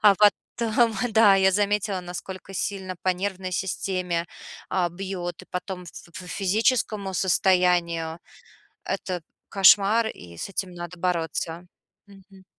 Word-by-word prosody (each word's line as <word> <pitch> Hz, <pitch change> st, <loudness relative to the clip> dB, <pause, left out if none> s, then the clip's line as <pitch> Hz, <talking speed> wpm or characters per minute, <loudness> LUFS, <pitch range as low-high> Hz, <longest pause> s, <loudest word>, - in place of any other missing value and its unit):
А 205 Hz, -2 st, +7 dB
потом, 225 Hz, +2 st, +2 dB, 0.2 s
да, 220 Hz, -3 st, +7 dB
я 190 Hz, 0 st, +4 dB
заметила, 205 Hz, -1 st, +1 dB
насколько 180 Hz, +2 st, -8 dB
сильно 190 Hz, -1 st, -3 dB
по -, -, 0 dB
нервной 185 Hz, 0 st, -1 dB
системе, 180 Hz, -2 st, -2 dB, 0.4 s
а, 180 Hz, -2 st, +1 dB
бьет 175 Hz, -1 st, -5 dB
и -, -, -15 dB
потом 180 Hz, 0 st, -4 dB
ф 175 Hz, -, -11 dB, 0.3 s
ф 180 Hz, -, -10 dB
физическому 205 Hz, 0 st, +1 dB
состоянию. 175 Hz, -3 st, +2 dB, 0.7 s
Это 180 Hz, -2 st, -3 dB, 0.3 s
кошмар. 205 Hz, +3 st, +6 dB
И 85 Hz, -, -8 dB
с -, -, -4 dB
этим 190 Hz, -1 st, -3 dB
надо 175 Hz, +1 st, -8 dB
бороться. 170 Hz, -1 st, -2 dB, 0.4 s
Мгм. 195 Hz, -1 st, -17 dB
190 Hz, 125 wpm, -25 LUFS, 180-200 Hz, 0.7 s, А